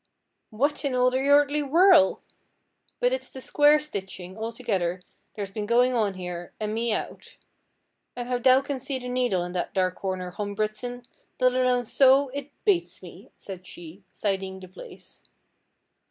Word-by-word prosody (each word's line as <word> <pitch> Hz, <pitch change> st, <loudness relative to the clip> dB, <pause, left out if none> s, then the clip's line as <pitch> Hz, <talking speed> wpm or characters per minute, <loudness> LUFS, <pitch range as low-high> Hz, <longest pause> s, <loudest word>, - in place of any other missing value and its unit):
'What 280 Hz, +8 st, 0 dB
in 275 Hz, -3 st, -1 dB
all 250 Hz, 0 st, +3 dB
the 260 Hz, -, 0 dB
earthly 290 Hz, +1 st, +4 dB
worl'! 320 Hz, +2 st, +5 dB, 0.8 s
But -, -, +2 dB
it's -, -, -4 dB
the 260 Hz, -, -9 dB
quare 295 Hz, 0 st, +6 dB
stitching, 190 Hz, -9 st, -7 dB
altogether, 215 Hz, -6 st, -2 dB, 0.3 s
there's 200 Hz, -3 st, -5 dB
been 210 Hz, 0 st, -4 dB
goin' 245 Hz, +2 st, +3 dB
on 210 Hz, -5 st, 0 dB
here, 180 Hz, -1 st, -7 dB
an' 215 Hz, -1 st, -2 dB
me 230 Hz, +1 st, -1 dB
out. -, -, -5 dB, 0.8 s
An' 245 Hz, -, -4 dB
how 250 Hz, 0 st, -1 dB
thou 255 Hz, +2 st, +5 dB
can 275 Hz, -1 st, -4 dB
see 265 Hz, +1 st, -3 dB
the 250 Hz, -1 st, -7 dB
needle 245 Hz, -8 st, 0 dB
in 175 Hz, -, -5 dB
that 180 Hz, -1 st, -4 dB
dark 185 Hz, -1 st, +1 dB
corner, 185 Hz, -1 st, -4 dB
Hom 205 Hz, +2 st, -5 dB
Bridson, 220 Hz, +4 st, -3 dB, 0.3 s
let 255 Hz, 0 st, +4 dB
alone 250 Hz, -1 st, +2 dB
sew, 270 Hz, +3 st, +4 dB
it 280 Hz, +1 st, -6 dB, 0.2 s
bates 385 Hz, -5 st, +1 dB
me,' -, -, -12 dB
said 185 Hz, -2 st, -10 dB
she, 175 Hz, +3 st, -11 dB
siding 190 Hz, -2 st, -3 dB
the 185 Hz, -, -11 dB
place. 185 Hz, -, -13 dB
245 Hz, 165 wpm, -26 LUFS, 195-270 Hz, 0.8 s, quare